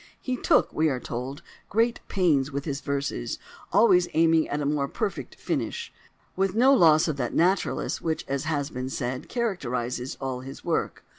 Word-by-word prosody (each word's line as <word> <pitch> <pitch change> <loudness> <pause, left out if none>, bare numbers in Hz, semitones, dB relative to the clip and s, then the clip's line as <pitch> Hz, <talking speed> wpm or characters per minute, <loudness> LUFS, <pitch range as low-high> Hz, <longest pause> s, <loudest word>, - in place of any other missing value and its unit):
"He 255 - -2
took," - - +2
we 155 0 +2
are 130 -3 -1
told, 125 +4 -5 0.3
"great 230 +3 +2
pains 150 -8 +2
with 140 0 -3
his 145 -3 -3
verses," 140 - -2 0.3
always 185 -6 +5
aiming 160 0 +4
at 145 - -1
a 145 - -2
more 145 -1 0
perfect 210 - -4
finish, 465 0 -3 0.4
with 195 0 0
no 260 +4 +6
loss 160 - +6
of 155 -3 -2
that 120 -3 -2
naturalness 185 +4 +1
which, 160 -1 -2
as 140 +2 -2
has 150 -2 -1
been 130 0 -4
said, 130 -1 -4
characterises 125 - -2
all 130 -2 -3
his 135 +1 -10
work. - - -1
150 Hz, 170 wpm, -26 LUFS, 135-185 Hz, 0.4 s, no